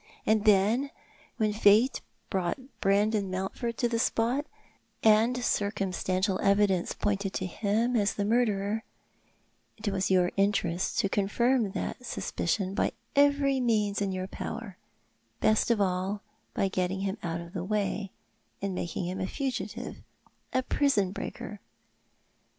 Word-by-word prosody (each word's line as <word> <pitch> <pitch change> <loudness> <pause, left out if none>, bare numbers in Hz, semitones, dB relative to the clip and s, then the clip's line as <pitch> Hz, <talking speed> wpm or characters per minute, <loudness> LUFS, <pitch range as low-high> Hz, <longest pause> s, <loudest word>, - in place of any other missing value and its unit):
And 215 -1 +2
then, 215 +7 +4 0.5
when 215 -2 +1
Fate 215 +4 +4 0.3
brought 180 -3 0 0.2
Brandon 200 0 +2
Mountford 195 +6 -3
to 240 - +2
the 230 -1 -1
spot, 245 +7 +1 0.6
and 225 +3 +4
circumstantial 190 -2 0
evidence 200 -3 +2
pointed 200 -1 -1
to 185 - -2
him 215 +6 0
as 205 -3 +2
the 200 - -1
murderer, 215 -2 +1 0.9
it 215 -1 -2
was 190 -1 0
your 180 -2 +3
interest 195 -3 +1
to 200 - +1
confirm 215 +2 +1
that 250 - -4
suspicion 190 -4 -2
by - - 0 0.2
every 280 -1 +4
means 210 -4 +1
in 200 -1 0
your 185 0 -3
power 200 +1 -6 0.3
— - - -42
best 215 +2 +3
of 235 -2 +3
all 190 +1 0 0.3
by 195 - +2
getting 190 0 -1
him 195 +1 -2
out 165 -1 -3
of 170 +1 -9
the 175 -3 -3
way 205 0 -1 0.3
— - - -43
by 200 - -2
making 180 -1 -3
him 185 +2 -3
a 185 - -1
fugitive, 270 +2 -4 0.5
a 255 - +1
prison 250 -10 +2
breaker. 205 +1 -6
205 Hz, 140 wpm, -29 LUFS, 190-225 Hz, 0.9 s, then